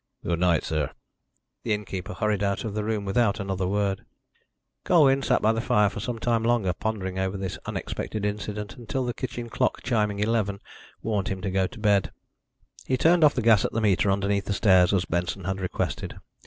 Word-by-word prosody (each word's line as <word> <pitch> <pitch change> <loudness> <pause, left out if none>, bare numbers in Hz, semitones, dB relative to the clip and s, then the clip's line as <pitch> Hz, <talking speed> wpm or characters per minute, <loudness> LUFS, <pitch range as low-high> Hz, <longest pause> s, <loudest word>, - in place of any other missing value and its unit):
"Good 85 -1 0
night, 90 -2 +3
sir." 75 -3 -1 0.7
The 110 - 0
innkeeper 100 -1 -6
hurried 105 -2 0
out 100 -1 0
of 110 - -3
the 105 0 -2
room 105 -1 -2
without 105 +1 +1
another 95 -2 -2
word. 100 0 0 0.8
Colwyn 140 -6 +4
sat - - +1
by 110 +1 +4
the 115 - -1
fire 105 -3 +3
for 105 - -6
some 120 +3 -3
time 115 0 +1
longer 115 -6 +2
pondering 95 -3 -3
over 95 +1 -1
this 95 -2 -4
unexpected 105 -1 -4
incident, 105 -1 -4
until 125 +2 -3
the 120 - -2
kitchen 120 -1 -5
clock - - -1
chiming 105 -4 0
eleven 105 -2 0 0.4
warned 105 -4 -1
him 95 - -3
to 95 - -2
go 95 0 +1
to 125 - -13
bed. 100 -3 +2 0.8
He 130 - +1
turned 165 +4 +4
off 150 - +6
the 125 - -1
gas 110 -4 +5
at - - -2
the 115 - 0
meter 100 -1 +2
underneath 100 +1 +1
the 100 - -1
stairs 95 -4 +4
as 95 -2 +1
Benson 90 +3 -2
had 95 +2 -2
requested. 95 - -3
105 Hz, 195 wpm, -26 LUFS, 95-115 Hz, 0.8 s, off